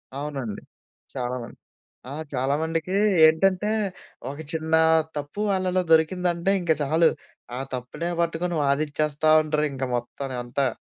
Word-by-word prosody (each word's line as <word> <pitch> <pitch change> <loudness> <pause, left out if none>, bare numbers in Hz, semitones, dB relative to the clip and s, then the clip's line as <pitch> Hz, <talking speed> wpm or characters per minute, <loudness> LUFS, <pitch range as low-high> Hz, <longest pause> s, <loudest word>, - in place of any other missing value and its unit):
అవునండి, 135 -7 -4 0.5
చాలామంది. 125 -1 -4 0.5
ఆ! - - -6 0.2
చాలా 135 +2 0
మందికి 165 +3 -2 0.3
ఏంటంటే, 190 +5 +2 0.6
ఒక 145 - -8
చిన్న 160 0 -1 0.4
తప్పు 145 +8 -5
వాళ్ళలో 185 -1 +1
దొరికిందంటే 175 +3 +2
ఇంక 170 -2 +2
చాలు. 160 +3 +3 0.5
ఆ - - -4
తప్పునే 150 +8 -4
పట్టుకొని 170 +1 -1
వాదిచ్చేస్తా 150 +2 +1
ఉంటారు 150 0 0
ఇంక 135 -1 -3
మొత్తంని 130 +2 -5
అంతా. 130 +3 -1
155 Hz, 115 wpm, -25 LUFS, 140-170 Hz, 0.6 s, చాలు